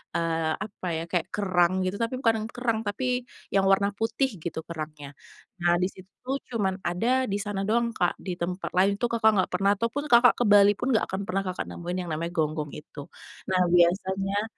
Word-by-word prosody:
eee, 165 -1 0 0.2
apa 195 -3 -8
ya, 160 - -3
kayak 175 -3 0
kerang 185 -3 +2
gitu, 190 - -2
tapi 230 +2 -1
bukan 230 -4 +3
yang 225 - -6
kerang, 235 -3 0
tapi 230 +6 -2 0.5
yang 195 - +4
warna 200 +1 +3
putih 225 +4 +1 0.2
gitu 165 -2 -4
kerangnya. 155 -3 -6 0.5
Nah 175 0 +4
di 185 - +3
situ 185 0 -15
tuh 265 +2 -2 0.2
cuman 190 -4 0
ada 180 +7 -2 0.2
di - - 0
sana 205 -1 -3
doang 235 +2 +2
Kak, 175 - +2
di 185 - -2
tempat 180 +2 -3
lain 195 +2 +5
itu 240 - +1
Kakak 225 -1 +4
gak - - -7
pernah 195 +2 +3
ataupun 230 +7 -2
Kakak 240 0 +7
ke 245 - +3
Bali 205 0 +7
pun 250 - -2
gak - - +2
akan 190 +1 -2
pernah 195 +1 0
Kakak 185 - -3
nemuin 175 +1 -5
yang 175 - -8
namanya 165 +2 -3
gonggong 155 -2 -1
itu. 150 - -13 0.5
Nah 185 - +2 0.2
biasanya 190 +3 +2
195 Hz, 200 wpm, -26 LUFS, 175-220 Hz, 0.5 s, Kakak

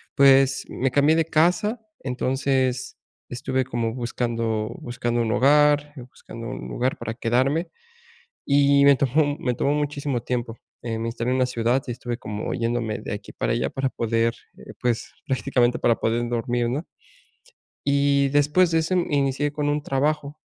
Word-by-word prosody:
Pues, 135 -1 +5
me 135 +1 -1
cambié 145 +3 +4
de 165 -1 +2
casa, 175 +9 +2 0.2
entonces 130 0 -1 0.3
estuve 130 +1 -2
como 115 -1 -2
buscando 115 -3 -2
buscando 120 -1 -2
un 110 -1 -1
hogar, 145 +2 +4 0.2
buscando 115 -2 -10
un - - -6
lugar 130 +2 -1
para 115 -1 -5
quedarme. 130 +8 0 0.8
Y 140 0 +4
me 140 -1 +7
tomó 145 +2 +1
me 125 - -1
tomó 140 - +1
muchísimo 145 -3 -2
tiempo, 120 -1 -3 0.2
eh, 115 -2 -3
me 115 - -2
instalé 115 +2 -2
en - - +1
una 130 - +3
ciudad 125 +2 0
y - - -2
estuve 120 0 -5
como 105 -4 -5
yéndome 115 -2 -2
de - - -5
aquí - - -8
para - - -2
allá - - 0
para 135 0 -2
poder, 115 -1 0 0.2
eh, - - -12
pues, 120 -2 -1
prácticamente 125 -1 +1
para 115 -1 +2
poder 120 +1 0
dormir, 120 0 -1
¿no? 140 +7 -2 1.0
Y 140 0 +3
después 150 +5 +3
de 165 - +2
ese 160 +3 0
inicié 145 -4 0
con 145 0 -1
un 145 0 0
trabajo 145 +2 -1
130 Hz, 160 wpm, -24 LUFS, 120-145 Hz, 1.0 s, me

